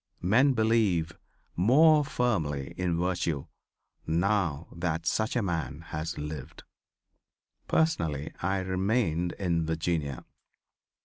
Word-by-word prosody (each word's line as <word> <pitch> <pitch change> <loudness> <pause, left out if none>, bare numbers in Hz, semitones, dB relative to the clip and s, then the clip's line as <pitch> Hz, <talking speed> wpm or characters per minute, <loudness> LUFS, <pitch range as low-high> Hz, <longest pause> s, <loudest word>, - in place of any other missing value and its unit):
Men 130 +10 +4
believe 110 -8 +2 0.4
more 150 - +5
firmly 85 - -1
in 90 -2 -1
virtue 85 -5 -1 0.6
now 85 -2 0
that 85 -1 -2
such 110 +7 0
a 120 - +1
man 80 -4 -3
has 80 +2 -4
lived." 75 -2 -7 1.0
Personally 80 - 0
I 95 +2 0
remained 95 -2 0
in 85 -4 0
Virginia. 80 -4 -2
85 Hz, 100 wpm, -28 LUFS, 80-110 Hz, 1.0 s, more